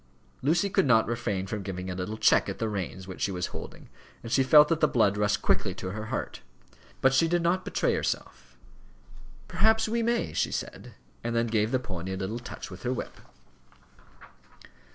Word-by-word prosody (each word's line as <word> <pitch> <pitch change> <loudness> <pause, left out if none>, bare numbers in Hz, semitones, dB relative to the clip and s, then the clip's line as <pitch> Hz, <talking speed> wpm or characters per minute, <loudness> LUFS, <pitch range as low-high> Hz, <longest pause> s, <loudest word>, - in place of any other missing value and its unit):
Lucy 165 +8 +2
could 185 - +2
not 115 -3 +5
refrain 110 -5 -2
from 105 +1 -4
giving 95 -1 -5
a 95 - -3
little 95 +4 -4
check - - +4
at - - -4
the 115 - -1
reins 95 -2 -4
which 95 - -8
she 100 - +1
was 90 -1 -2
holding, - - -9 0.4
and 115 - -7
she 135 - +4
felt 150 +3 +7
that 165 -1 0
the 155 - +4
blood 105 -7 +2
rushed 105 0 0
quickly - - +1
to 95 - -5
her 110 +2 -5
heart. - - -4 0.6
But 135 0 +4
she 150 +5 +4
did 175 0 +1
not 180 +2 +1
betray - - 0
herself. 60 0 -4 0.9
"Perhaps 220 +2 +3
he 230 +2 0
may," 235 +1 0
she - - 0
said, - - -6 0.3
and 120 0 -2
then 115 0 +2
gave 110 -1 +1
the 130 - +2
pony 95 -7 -5
a - - -3
little 100 +5 -3
touch 120 - -8
with 90 - -10
her 125 - -1
whip. 130 - -4
115 Hz, 195 wpm, -28 LUFS, 95-150 Hz, 0.9 s, felt